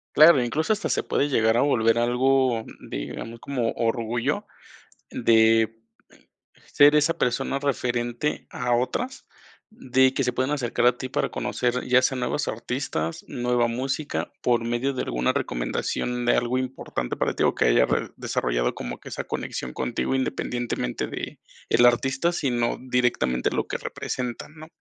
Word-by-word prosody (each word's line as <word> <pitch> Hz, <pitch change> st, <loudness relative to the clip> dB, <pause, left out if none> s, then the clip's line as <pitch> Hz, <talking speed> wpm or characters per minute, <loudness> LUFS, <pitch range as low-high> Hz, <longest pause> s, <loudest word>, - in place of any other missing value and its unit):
Claro, 155 Hz, -4 st, +8 dB
incluso 155 Hz, -, 0 dB
hasta 210 Hz, -1 st, -3 dB
se -, -, 0 dB
puede 145 Hz, -, 0 dB
llegar 110 Hz, -4 st, +3 dB
a 120 Hz, -, +3 dB
volver 115 Hz, -5 st, +3 dB
algo 125 Hz, 0 st, +2 dB, 0.2 s
digamos, 115 Hz, -, -6 dB
como 125 Hz, -4 st, -2 dB
orgullo 115 Hz, +1 st, -1 dB, 0.7 s
de 115 Hz, 0 st, +3 dB, 0.9 s
ser 145 Hz, +1 st, +6 dB
esa 150 Hz, +2 st, +3 dB
persona 135 Hz, +2 st, 0 dB
referente 125 Hz, -1 st, -1 dB
a 125 Hz, -1 st, 0 dB
otras, 245 Hz, -, -2 dB, 0.5 s
de 130 Hz, -, +2 dB
que 135 Hz, -, 0 dB
se 125 Hz, -1 st, 0 dB
puedan 130 Hz, +3 st, 0 dB
acercar 125 Hz, -4 st, 0 dB
a 125 Hz, 0 st, +5 dB
ti 130 Hz, +1 st, -6 dB
para -, -, -1 dB
conocer, 125 Hz, 0 st, -1 dB
ya 130 Hz, +1 st, +4 dB
sean 130 Hz, -, +1 dB
nuevos 125 Hz, +4 st, -1 dB
artistas, 110 Hz, -, -3 dB
nueva 120 Hz, -1 st, +1 dB
música, 135 Hz, +5 st, -3 dB
por 120 Hz, -1 st, +2 dB
medio 120 Hz, +4 st, -1 dB
de 130 Hz, -, -2 dB
alguna 60 Hz, +1 st, 0 dB
recomendación 120 Hz, -, -2 dB
de -, -, +4 dB
algo 120 Hz, +1 st, 0 dB
importante 125 Hz, -, -4 dB
para -, -, 0 dB
ti, -, -, -5 dB
o -, -, +3 dB
que -, -, +2 dB
haya -, -, +4 dB
re -, -, -1 dB
desarrollado -, -, -1 dB
como -, -, -6 dB
que -, -, -11 dB
esa -, -, -4 dB
conexión 65 Hz, -1 st, -5 dB
contigo, 120 Hz, +2 st, -2 dB
independientemente 120 Hz, -, -2 dB
de -, -, -6 dB, 0.3 s
el 120 Hz, -, +5 dB
artista, 135 Hz, +7 st, +2 dB
sino 125 Hz, -8 st, 0 dB
directamente 125 Hz, -, +1 dB
lo -, -, -2 dB
que -, -, -3 dB
representan, 125 Hz, +3 st, -5 dB
¿no? 155 Hz, 0 st, -11 dB
125 Hz, 155 wpm, -25 LUFS, 115-135 Hz, 0.9 s, Claro